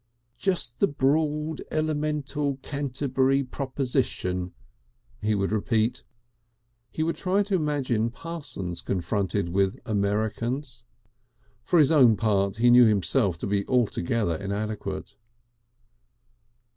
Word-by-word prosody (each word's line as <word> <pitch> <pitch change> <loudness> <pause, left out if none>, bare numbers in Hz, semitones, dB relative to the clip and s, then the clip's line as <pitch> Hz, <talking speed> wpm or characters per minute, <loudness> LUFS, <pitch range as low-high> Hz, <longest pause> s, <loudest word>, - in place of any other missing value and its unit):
"Just 180 -11 -1
the 200 - +4
Broad 150 +2 0
Elemental 150 -2 -1
Canterbury 135 -1 0
praposition," 125 -9 -2 0.7
he 105 0 +1
would 100 0 -1
repeat.... 110 +3 0 0.9
He 155 - -2
would 165 +1 -1
try 195 +2 +1
to 200 0 -4
imagine 140 - 0
Parsons 125 - -5
confronted 100 0 -1
with 95 +2 0
Americans. 110 +5 -2 0.8
For 175 - +2
his 150 -2 +5
own 125 -9 +6
part 100 -3 +1
he 120 +1 +5
knew 125 0 +8
himself 100 -2 +2
to - - -5
be 100 0 0
altogether 115 -5 +1
inadequate.... 105 +4 -4
125 Hz, 105 wpm, -26 LUFS, 105-145 Hz, 0.9 s, knew